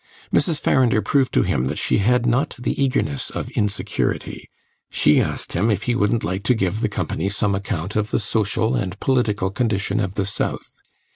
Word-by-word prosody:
Mrs. 160 -5 +2
Farrinder 120 -4 +3
proved 135 -3 +2
to - - +4
him 65 - 0
that 70 +3 -2
she - - +1
had 120 +4 +2
not 125 +6 +1
the 125 - -1
eagerness 75 - -1
of - - -5
insecurity; 105 -1 -2 0.4
she - - +4
asked - - -3
him 100 +7 +1
if 105 -1 0
he 120 - +1
wouldn't 115 0 +1
like 95 +4 -2
to 125 - +4
give 100 0 -1
the 110 - +1
company 100 -1 -2
some 100 0 0
account 95 -1 -3
of 105 0 0
the - - +1
social 110 +2 0
and 95 -4 -3
political 105 -7 +1
condition 105 -2 0
of 95 -2 -2
the 100 - 0
South. 105 - -4
105 Hz, 190 wpm, -22 LUFS, 100-120 Hz, 0.4 s, to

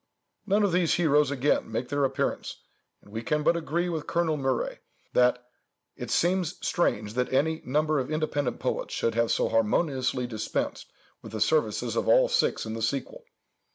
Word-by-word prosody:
None 205 +1 +3
of 200 - +2
these 175 -1 +2
heroes 150 -4 +3
again 140 -3 0
make 120 +3 -3
their 145 -1 +1
appearance, 135 - -3 0.4
and 100 - -18
we 110 +1 -4
can 150 +5 -1
but 170 - +3
agree 170 +1 -1
with 160 -4 -3
Colonel 170 -2 +1
Mure, 135 -4 -1 0.3
that 125 0 +3 0.5
"it - - -7
seems 180 -1 +1
strange 105 -11 0
that 125 +1 -1
any 160 +4 +1
number 150 +3 +1
of 130 - -3
independent 150 -4 -1
poets - - -2
should 115 - 0
have 115 0 +1
so - - +2
harmoniously 125 +3 +1
dispensed 110 -3 -3 0.3
with - - -11
the - - -3
services 480 -1 +1
of - - -1
all - - +5
six 480 - +1
in 110 - -4
the 115 - -5
sequel." 130 +5 -3
145 Hz, 175 wpm, -27 LUFS, 125-165 Hz, 0.5 s, all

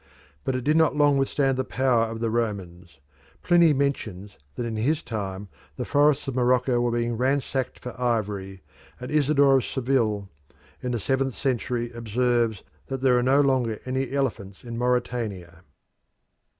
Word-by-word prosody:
But 130 - -1
it 130 - -2
did 150 +4 +3
not 160 -2 +3
long 145 -2 +4
withstand 135 -1 +1
the - - +1
power 125 -3 +1
of 115 0 -6
the 115 -1 0
Romans. 95 -9 -3 0.5
Pliny 170 -2 +5
mentions 110 -9 -2 0.2
that 120 - -3
in 115 -1 -3
his 145 +9 0
time 100 -3 -5 0.3
the - - -4
forests 145 0 +2
of 135 - -2
Morocco 125 0 +2
were 120 - +1
being 120 0 -1
ransacked 130 0 -1
for 125 - -8
ivory, 100 -5 -2 0.4
and 125 - -7
Isidore 140 -2 +4
of 130 - 0
Seville, 120 -6 0 0.5
in 125 - -3
the 120 - -1
seventh 135 +4 -1
century 120 -2 -2
observes 120 -1 0 0.2
that 135 -1 -4
"there 130 -2 +4
are 125 - +3
no 135 +3 +4
longer 130 -6 +1
any 130 0 -2
elephants 115 -8 -3
in 120 -1 -7
Mauritania." 115 -8 -2
125 Hz, 160 wpm, -25 LUFS, 110-135 Hz, 0.5 s, Pliny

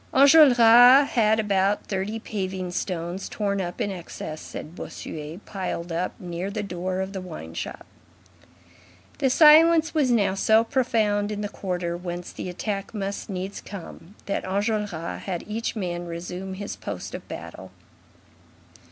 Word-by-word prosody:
Enjolras 265 -2 +8
had 220 -2 +3
about 200 -1 +1
thirty 195 +3 -3
paving 190 -4 -4
stones 175 +1 -3
"torn 200 -2 -1
up 175 -1 -5
in 205 - -1
excess," 170 -3 -7
said 155 - -8
Bossuet, 155 +3 -8
piled 180 -3 -4
up 170 +2 -3
near 175 +1 -4
the 210 +1 -3
door 185 0 -3
of 190 +1 -4
the 190 - -4
wine 155 - -8
shop. - - -6 1.3
The 265 - +3
silence 320 +3 +6
was 295 -5 +2
now 205 -6 +3
so 220 +3 +4
profound 220 -5 +1
in 210 0 -3
the 205 - -3
quarter 180 -3 -3
whence 175 0 -6
the - - -6
attack 195 +3 -4
must 200 0 -4
needs 190 +1 -5
come, 190 -1 -10
that 200 - -2
Enjolras 210 +2 -1 0.3
had 180 -3 -4
each 225 +3 -3
man 175 -4 -3
resume 180 +3 -6
his 200 +1 -5
post - - -6
of - - -7
battle. - - -8
195 Hz, 145 wpm, -25 LUFS, 180-220 Hz, 1.3 s, Enjolras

